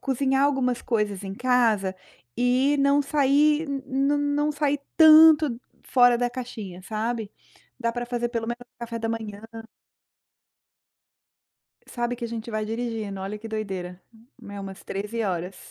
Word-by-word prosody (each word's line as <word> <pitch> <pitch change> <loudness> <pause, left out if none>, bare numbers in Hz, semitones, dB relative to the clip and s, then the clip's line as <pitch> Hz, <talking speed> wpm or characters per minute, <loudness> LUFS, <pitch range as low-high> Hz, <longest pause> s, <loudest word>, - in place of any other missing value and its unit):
cozinhar 270 0 +1
algumas 260 -4 0
coisas 210 -4 -1
em 195 - -5
casa 225 -5 +1 0.4
e 255 +4 +2
não 280 +1 +4
sair, 295 +2 +2 0.2
não 275 +2 +1
não 290 +1 0
sair 290 -1 0 0.2
tanto 310 -4 +7 0.2
fora 245 -2 +4
da 245 0 +1
caixinha, 225 -7 -7
sabe? 220 +1 -3 0.5
Dá 235 -1 0
para 240 +1 -4
fazer 240 0 -2
pelo 230 -2 -3
menos 240 +1 -4
o 245 0 -23
café 235 -1 -5
da 225 0 -3
manhã. 220 -3 -5 2.5
Sabe 240 0 -3
que 240 - -6
a - - -3
gente 230 0 -6
vai 215 -1 -2
dirigindo, 220 -3 -4
olha 195 +2 -5
que 225 +1 -9
doideira, 190 -5 -5 0.5
é 200 0 -7
umas 195 -1 -8
13 210 +4 -4
horas, 180 -1 -3
240 Hz, 145 wpm, -25 LUFS, 215-270 Hz, 2.5 s, tanto